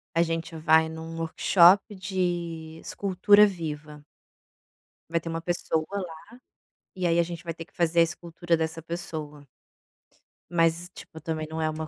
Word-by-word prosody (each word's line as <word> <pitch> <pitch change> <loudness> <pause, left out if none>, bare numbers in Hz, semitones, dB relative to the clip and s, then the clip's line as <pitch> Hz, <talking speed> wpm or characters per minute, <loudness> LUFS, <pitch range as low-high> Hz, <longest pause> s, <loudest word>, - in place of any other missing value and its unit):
a 165 - +4
gente 165 0 -2
vai 160 0 +4
num 160 0 -7
workshop 180 +5 +4
de 175 -4 -3
escultura 205 +2 +4
viva 150 -5 -6 1.1
vai 165 - +1
ter 165 0 -7
uma 165 0 -3
pessoa 165 -2 -1
lá, 180 -5 -4 0.8
e 180 -1 -1
aí 170 0 +2
a - - +5
gente 170 0 -6
vai 165 -1 -4
ter 165 0 -8
que 195 - -31
fazer 170 -1 +3
a - - +8
escultura 170 0 -1
dessa 160 0 -3
pessoa. 155 -3 -6 1.0
Mas, 170 +1 +1
tipo, 160 - -11
também 155 -1 -3
não 160 0 -4
é 155 - +1
uma 155 0 -4
165 Hz, 155 wpm, -27 LUFS, 160-175 Hz, 1.1 s, a